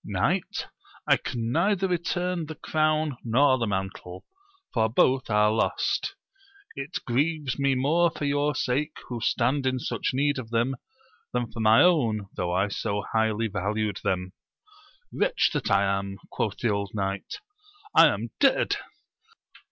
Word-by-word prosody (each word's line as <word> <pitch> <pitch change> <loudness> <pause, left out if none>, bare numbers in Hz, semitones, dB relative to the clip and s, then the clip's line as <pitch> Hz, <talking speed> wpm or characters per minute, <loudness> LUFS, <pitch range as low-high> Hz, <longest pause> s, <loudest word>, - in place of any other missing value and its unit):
Knight, - - -1 0.4
I - - +5
can 115 -2 -4
neither 195 +6 +2
return 175 -1 -1
the 160 - -7
crown 155 -2 0
nor 130 +3 +3
the 115 - 0
mantle, 95 -2 -4 0.5
for 110 -2 +2
both 130 +3 +2
are 105 0 +4
lost: 110 - 0 0.6
it - - -4
grieves 145 +2 0
me 140 -1 +2
more 160 +7 +3
for 155 -3 -5
your 145 0 +1
sake 135 +3 -1
who 120 -2 -4
stand 130 +5 +1
in 130 0 +1
such 125 - -2
need 140 +1 +1
of 115 -3 -8
them, 120 +3 0 0.6
than 120 -2 -2
for 115 - -8
my 110 +1 +6
own, 115 - +2
though 90 -1 -2
I 95 +3 +1
so 100 +1 -2
highly 110 0 +1
valued 105 +1 -2
them. 90 0 -1 0.8
Wretch - - +2
that 145 -6 -2
I 100 0 +4 0.2
am! 100 0 -6
quoth 105 -3 -2
the 120 - 0
old 100 0 -2
knight; 100 -1 -3 0.6
I - - +9
am - - -2
dead - - +3
120 Hz, 150 wpm, -26 LUFS, 105-145 Hz, 0.8 s, I